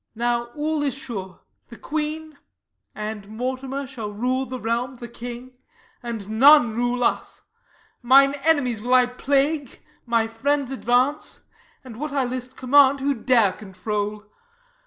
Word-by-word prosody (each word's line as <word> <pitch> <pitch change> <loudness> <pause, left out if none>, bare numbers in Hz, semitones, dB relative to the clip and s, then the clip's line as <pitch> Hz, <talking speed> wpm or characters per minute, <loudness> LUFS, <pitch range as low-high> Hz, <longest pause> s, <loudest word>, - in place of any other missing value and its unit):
Now 240 +1 0
all 305 0 -1
is 280 -3 -1
sure: 215 -10 -7 0.3
the 235 - -11
queen 310 0 -4 0.6
and 210 -1 -6
Mortimer 260 +4 -4
Shall 230 -5 -7
rule 255 +5 -1
the 255 0 -6
realm, 235 +3 -2
the 240 -1 -9
king; 240 +2 -8 0.5
and 230 -5 -6
none 280 -4 +7
rule 245 +1 -1
us. - - -2 0.6
Mine 275 +3 +6
enemies 275 -9 +2
will 250 +3 +2
I 250 -1 +6
plague, 275 +3 -1 0.3
my 230 -1 +2
friends 270 +4 -1
advance; 255 +2 0 0.4
And 245 -4 -11
what 300 +1 -4
I 275 -2 +1
list 255 +1 -6
command 275 +1 +5
who 280 +1 +1
dare 230 -5 +3
control? 210 +2 -4
250 Hz, 135 wpm, -23 LUFS, 230-275 Hz, 0.6 s, none